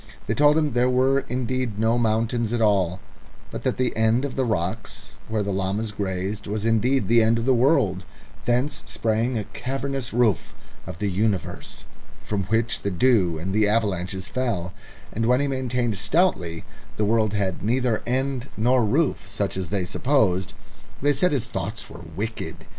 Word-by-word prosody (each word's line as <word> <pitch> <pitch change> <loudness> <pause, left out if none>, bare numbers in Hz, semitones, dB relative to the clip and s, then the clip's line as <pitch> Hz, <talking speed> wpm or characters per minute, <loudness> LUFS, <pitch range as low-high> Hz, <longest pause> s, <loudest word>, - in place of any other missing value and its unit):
They - - -1
told 150 +1 +4
him 150 -4 +1
there 125 +1 +3
were 130 +2 +3
indeed 125 -2 -2
no 110 +2 +2
mountains 115 0 0
at 120 - 0
all, 95 -5 +2 0.5
but - - -5
that - - -1
the 130 -1 0
end 110 +4 +2
of 140 - -5
the 135 - +1
rocks 105 -1 -3
where 110 -1 -1
the 100 - -2
llamas 100 +3 -1
grazed 100 0 -3
was 105 +1 -2
indeed 115 +1 +2
the 115 +1 +5
end 115 +1 +3
of 115 - -2
the 130 - +4
world; 115 - +2 0.4
thence 125 +5 0
sprang 115 +2 0
a 105 - -2
cavernous 135 +2 -4
roof 115 -6 +1 0.3
of 90 -3 -6
the 105 - -1
universe, 95 -2 -2 0.4
from 100 -3 -2
which 110 +1 0
the 100 - -1
dew 90 -3 +3
and 90 +5 -3
the 105 0 +3
avalanches 95 -3 0
fell; 110 -9 -2 0.4
and 115 +1 0
when 125 +1 +4
he 145 - +1
maintained 125 -5 -1
stoutly 100 - +1 0.3
the 105 - +1
world 110 0 +2
had 95 -4 -1
neither 120 +2 +1
end 130 +1 -1
nor 120 +3 +3
roof 140 +8 0
such 100 -2 -2
as 95 -4 -3
they 95 -1 -1
supposed, 95 -5 +1 0.4
they 145 +1 +2
said 180 +7 +2
his 130 -5 0
thoughts 105 -1 -5
were 85 - -10
wicked. 110 +4 -5
110 Hz, 175 wpm, -24 LUFS, 100-125 Hz, 0.5 s, the